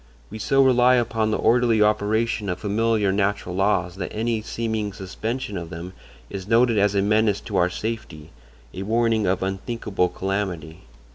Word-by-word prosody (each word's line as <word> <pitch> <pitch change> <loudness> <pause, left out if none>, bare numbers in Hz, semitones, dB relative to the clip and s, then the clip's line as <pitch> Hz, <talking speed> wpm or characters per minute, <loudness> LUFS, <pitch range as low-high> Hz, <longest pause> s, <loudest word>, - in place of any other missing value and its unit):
We 110 - -7
so 135 +5 +3
rely 125 -1 +5
upon 115 -2 0
the 110 - 0
orderly 120 -1 +3
operation 105 0 +1
of 90 - -2
familiar 105 0 +1
natural 100 -2 -1
laws 95 -2 0
that 90 - -4
any 110 0 -1
seeming 110 -2 -3
suspension 105 +3 -4
of 85 -1 -8
them 90 +2 -7 0.3
is 95 +5 -7
noted 115 0 +3
as 100 0 +2
a 100 - +2
menace 105 -1 +2
to 105 -4 -3
our 90 0 +3
safety, 90 -7 -6 0.4
a 95 - -6
warning 110 0 +1
of 95 +1 0
unthinkable 95 -1 -2
calamity. 95 -3 -4
105 Hz, 160 wpm, -23 LUFS, 95-115 Hz, 0.4 s, rely